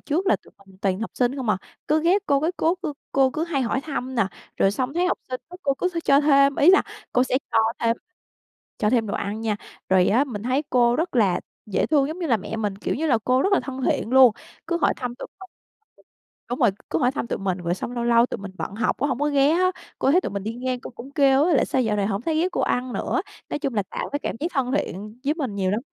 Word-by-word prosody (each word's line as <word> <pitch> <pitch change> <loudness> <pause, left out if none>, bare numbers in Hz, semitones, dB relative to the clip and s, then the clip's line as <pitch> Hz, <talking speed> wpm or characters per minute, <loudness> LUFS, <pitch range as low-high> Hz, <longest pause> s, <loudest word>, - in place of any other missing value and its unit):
trước 335 +6 -1
là - - +4
tụi - - -22
mình 190 - -18
toàn 190 0 0
học 225 - -3
sinh 250 +2 +1
không 255 -5 -4
à, 205 - +3 0.3
cứ 310 +1 +2
ghé 360 +5 +4
cô, 280 -1 +3
cái 320 +4 0
cố 330 +3 +2
cô 310 -5 -2 0.2
cô 265 -1 +4
cứ 315 +4 -2
hay 290 -6 -1
hỏi 260 +3 0
thăm 260 -3 -4
nè. 225 -5 +2 0.3
Rồi 195 - +3
xong 255 +6 -2
thấy 355 +1 +2
học - - 0
sinh 255 -1 -4
á, 360 - -10
cô 275 -2 +1
cứ 365 - 0
th 355 - -10
cho 275 0 +5
thêm, 275 -1 +4
ý 310 - +6
là 380 - +6 0.3
cô 250 +1 +3
sẽ 255 - +1
cho - - +3 0.2
thêm 230 0 +2 0.8
cho 210 - +2
thêm 230 -3 +2
đồ 200 - -3
ăn 205 +2 -3
nha. 220 -2 -1 0.3
Rồi 185 -1 +4
á, 250 +7 +3
mình 215 -7 -6
thấy 255 +4 +1
cô 240 -1 +4
rất 325 -3 -1
là 200 -6 +3 0.3
dễ 205 - 0
thương 285 -3 +2
giống 320 +4 -5
như 345 - -2
là 240 -6 +3
mẹ 220 +3 -6
mình, 205 -3 -2
kiểu - - -2
như 320 +4 -1
là 245 -6 +3
cô 255 +1 +3
rất 395 - +1
là - - +4
thân 265 -1 -6
thiện 230 - 0
luôn. 260 -3 +7 0.3
Cứ 340 0 0
hỏi - - +3
thăm 245 -2 -4
tụi - - -8
mình 380 -1 -11 1.0
đúng 245 - -3
rồi, - - +4 0.2
cứ - - +1
hỏi 250 -3 +3
thăm 275 - -3
tụi - - -3
mình. 190 -2 -2
Rồi 175 0 -1
xong 235 - -5
lâu 240 -1 -2
lâu 235 0 +5
tụi - - -5
mình 195 -1 -8
bận 200 - -4
học 220 0 0
cũng 285 - 0
không 260 -2 -1
có 295 - +2
ghé 285 0 +3
á, 365 +3 +3 0.3
cô 270 - +2
thấy 360 - +5
tụi - - -4
mình 200 -1 -4
đi 220 +2 -3
ngang, 250 0 -3
cô - - -8
cũng 255 +2 -11
kêu 275 -1 +4
á, 340 -2 +3
là: - - +4
"Sao 260 - 0
dạo 215 -3 0
này 200 -1 +1
hổng 205 +1 -2
thấy 315 +1 -1
ghé 360 - +2
cô - - -1
ăn 250 0 0
nữa?" - - -1 0.3
Nói - - -2
chung 275 -5 -3
là 205 - +1
tạo - - -4
cái 285 - 0
cảm - - -4
giác 315 - 0
thân 260 -2 0
thiện 210 +3 -5
với 295 - +1
mình 270 -11 -3
nhiều 190 -2 0
lắm. 210 +4 0
255 Hz, 285 wpm, -24 LUFS, 225-290 Hz, 1.0 s, luôn